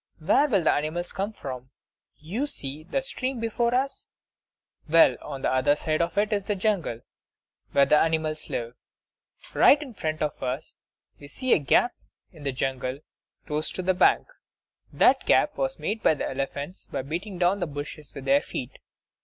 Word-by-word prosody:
Where 200 Hz, -, +3 dB
will 200 Hz, -, +2 dB
the -, -, +4 dB
animals 160 Hz, +4 st, -2 dB
come 200 Hz, +2 st, -3 dB
from? 130 Hz, -, -7 dB, 0.5 s
You 200 Hz, -, -3 dB
see 140 Hz, -, -5 dB
the 270 Hz, +9 st, -1 dB
stream 260 Hz, -1 st, -3 dB
before 235 Hz, +1 st, 0 dB
us; 275 Hz, +2 st, -1 dB, 0.8 s
well, 165 Hz, +1 st, +6 dB
on 140 Hz, -3 st, -7 dB
the -, -, +1 dB
other 130 Hz, +3 st, +3 dB
side 155 Hz, +1 st, -1 dB
of 170 Hz, +4 st, -2 dB
it 210 Hz, +2 st, +2 dB
is 200 Hz, -2 st, -1 dB
the 210 Hz, -, 0 dB
jungle, 185 Hz, -, -1 dB, 0.7 s
where 140 Hz, -, +5 dB
the 150 Hz, -, +5 dB
animals 160 Hz, -1 st, 0 dB
live. 120 Hz, 0 st, -3 dB, 0.8 s
Right 285 Hz, -, +6 dB
in 285 Hz, -5 st, -8 dB
front 155 Hz, -5 st, -2 dB
of 150 Hz, -, -3 dB
us 130 Hz, +3 st, -4 dB, 0.4 s
we 145 Hz, -, -11 dB
see 255 Hz, -, 0 dB
a -, -, +4 dB
gap 195 Hz, -, +3 dB, 0.4 s
in 160 Hz, -5 st, -15 dB
the 140 Hz, -1 st, -1 dB
jungle 130 Hz, +1 st, -3 dB, 0.4 s
close 150 Hz, 0 st, -2 dB
to 185 Hz, -, -3 dB
the 185 Hz, +1 st, +3 dB
bank. 180 Hz, -, +4 dB, 0.7 s
That -, -, +3 dB
gap -, -, +4 dB
was -, -, -2 dB
made 215 Hz, +1 st, -3 dB
by -, -, +4 dB
elephants 140 Hz, +5 st, -4 dB
by -, -, -4 dB
beating 175 Hz, +7 st, -5 dB
down 180 Hz, +3 st, +2 dB
the 175 Hz, -, -1 dB
bushes 145 Hz, 0 st, -7 dB
with 135 Hz, -, -7 dB
their 140 Hz, +1 st, +4 dB
feet. 125 Hz, -, -6 dB
160 Hz, 175 wpm, -26 LUFS, 140-210 Hz, 0.8 s, well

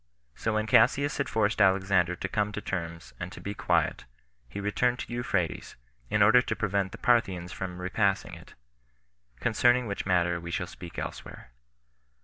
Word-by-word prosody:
So 110 Hz, -, -2 dB
when 110 Hz, 0 st, +1 dB
Cassius 140 Hz, +6 st, +3 dB
had 140 Hz, -, -1 dB
forced 110 Hz, 0 st, +1 dB
Alexander 95 Hz, -2 st, +3 dB
to 95 Hz, -, -4 dB
come 105 Hz, +2 st, -1 dB
to 105 Hz, -, -3 dB
terms 85 Hz, -5 st, -5 dB
and 90 Hz, +1 st, -5 dB
to -, -, -10 dB
be 100 Hz, -, -5 dB
quiet, -, -, 0 dB, 0.4 s
he 100 Hz, -, -6 dB
returned 120 Hz, +5 st, +1 dB
to 120 Hz, -, -6 dB
Euphrates, 100 Hz, -8 st, -2 dB, 0.3 s
in 105 Hz, -, +3 dB
order 110 Hz, +4 st, +7 dB
to -, -, -3 dB
prevent 100 Hz, -2 st, -1 dB
the -, -, -8 dB
Parthians 95 Hz, -8 st, +1 dB
from 90 Hz, -1 st, -6 dB
repassing 95 Hz, +2 st, 0 dB
it; -, -, -13 dB, 0.8 s
concerning 120 Hz, -, +3 dB
which 100 Hz, -3 st, -4 dB
matter 85 Hz, -2 st, +2 dB
we 85 Hz, 0 st, -8 dB
shall 90 Hz, +1 st, -2 dB
speak 90 Hz, -1 st, -11 dB
elsewhere. -, -, -7 dB
100 Hz, 165 wpm, -28 LUFS, 90-110 Hz, 0.8 s, order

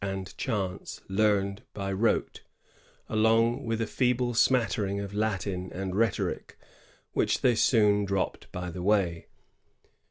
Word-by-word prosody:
and 95 Hz, -1 st, -4 dB
chants 100 Hz, -7 st, -3 dB
learned 100 Hz, 0 st, +1 dB
by 100 Hz, -1 st, -3 dB
rote, 110 Hz, +4 st, 0 dB, 0.7 s
along 115 Hz, +2 st, +2 dB
with 115 Hz, -1 st, -2 dB
a 115 Hz, -, 0 dB
feeble 125 Hz, +1 st, 0 dB
smattering 110 Hz, -4 st, +2 dB
of 100 Hz, 0 st, -5 dB
Latin 100 Hz, -3 st, -2 dB
and 95 Hz, 0 st, -4 dB
rhetoric, 115 Hz, +2 st, -1 dB, 0.6 s
which -, -, +1 dB
they 125 Hz, -, +4 dB
soon 105 Hz, -3 st, +3 dB
dropped 100 Hz, -1 st, -2 dB
by 90 Hz, 0 st, -5 dB
the 90 Hz, -, -6 dB
way. 95 Hz, -4 st, +1 dB
105 Hz, 125 wpm, -28 LUFS, 95-115 Hz, 0.7 s, they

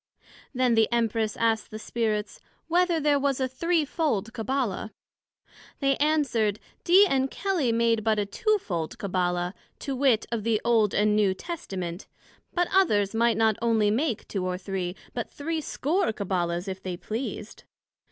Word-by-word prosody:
Then 255 Hz, -2 st, +2 dB
the 225 Hz, 0 st, +3 dB
Empress 225 Hz, -2 st, 0 dB
asked 225 Hz, -2 st, +1 dB
the 215 Hz, -, -7 dB
Spirits, 220 Hz, -1 st, -2 dB, 0.3 s
Whether 345 Hz, 0 st, +2 dB
there 290 Hz, -1 st, +3 dB
was 275 Hz, -1 st, 0 dB
a 260 Hz, -, +1 dB
threefold 295 Hz, -, 0 dB
Cabbala? 230 Hz, -3 st, -2 dB, 0.9 s
They 275 Hz, -1 st, +2 dB
answered, 270 Hz, -9 st, +1 dB, 0.2 s
Dee 380 Hz, +4 st, +7 dB
and 270 Hz, -6 st, +1 dB
Kelly 355 Hz, -, 0 dB
made 230 Hz, -1 st, +2 dB
but 220 Hz, -1 st, +2 dB
a 205 Hz, -, +1 dB
two 430 Hz, -, +1 dB
fold 170 Hz, -, -4 dB
Cabbala, 180 Hz, -2 st, -1 dB, 0.2 s
to 275 Hz, -, -4 dB
wit, 255 Hz, -4 st, +3 dB
of 230 Hz, -3 st, -2 dB
the 225 Hz, -1 st, +1 dB
Old 225 Hz, -4 st, +3 dB
and 210 Hz, 0 st, +3 dB
New 200 Hz, -3 st, +3 dB
Testament, 190 Hz, -, -6 dB, 0.4 s
but 350 Hz, -1 st, +1 dB
others 210 Hz, -, +3 dB
might 230 Hz, +1 st, +2 dB
not 220 Hz, -2 st, +3 dB
onely 220 Hz, -3 st, +3 dB
make 240 Hz, 0 st, -1 dB
two 195 Hz, -3 st, -3 dB
or 180 Hz, 0 st, -2 dB
three, 185 Hz, -1 st, -4 dB, 0.2 s
but 235 Hz, -, -4 dB
threescore 320 Hz, -, -1 dB
Cabbala's, 180 Hz, -3 st, -2 dB
if 190 Hz, 0 st, -5 dB
they 185 Hz, -2 st, -4 dB
pleased. 220 Hz, +8 st, -6 dB
225 Hz, 150 wpm, -26 LUFS, 205-280 Hz, 0.9 s, Dee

